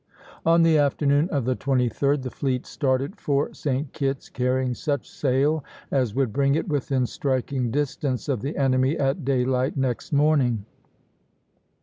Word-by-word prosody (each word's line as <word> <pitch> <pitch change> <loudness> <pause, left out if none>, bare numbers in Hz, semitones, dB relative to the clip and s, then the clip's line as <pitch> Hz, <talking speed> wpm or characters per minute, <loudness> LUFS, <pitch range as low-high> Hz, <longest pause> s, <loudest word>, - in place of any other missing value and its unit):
On 165 0 +5
the 160 -2 +4
afternoon 145 +2 +2
of 140 -9 -1
the 130 0 +1
23d 135 +2 +1
the 130 - -5
fleet 130 -2 -2
started 135 +7 -1
for 140 0 0
St. 140 0 -2
Kitt's, 135 -2 -2
carrying 130 0 0
such 140 0 -2
sail 140 +3 +1 0.3
as 125 -6 0
would 130 -5 0
bring 140 0 +2
it 160 - -1
within 135 -4 0
striking 130 -1 -1
distance 140 -1 -2
of 130 -7 -1
the 140 +4 -4
enemy 130 +1 +2
at 140 +3 0
daylight 130 0 0
next 130 -3 -2
morning. 140 -8 +2
135 Hz, 145 wpm, -24 LUFS, 130-145 Hz, 0.3 s, On